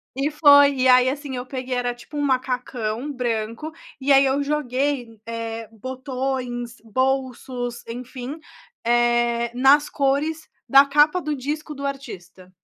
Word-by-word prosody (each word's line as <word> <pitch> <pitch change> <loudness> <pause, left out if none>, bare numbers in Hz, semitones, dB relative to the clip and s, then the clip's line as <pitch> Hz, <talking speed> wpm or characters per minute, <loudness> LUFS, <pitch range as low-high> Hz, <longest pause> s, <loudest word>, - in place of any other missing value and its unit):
e 280 +3 -1
foi. 285 -2 +6
E 260 0 +2
aí 255 0 +6
assim, 280 -1 -5
eu 250 0 -5
peguei, 255 -1 -4
era 245 0 -1
tipo 245 +5 -14
um - - 0
macacão 255 -2 -2
branco, 235 +2 -3 0.3
e 275 +1 +3
aí 275 0 +7
eu 270 +1 +1
joguei, 275 -4 -2
eh, 230 -1 -5
botões, 255 0 -4
bolsos, 255 0 -2
enfim, 250 +4 -7 0.5
eh, 240 0 +2
nas 275 +4 +4
cores 295 +3 -1 0.2
da 275 +1 +8
capa 295 +5 +3
do 300 -2 -2
disco 300 +3 -5
do 280 0 -6
artista. 190 -10 -7
260 Hz, 140 wpm, -23 LUFS, 240-280 Hz, 0.5 s, da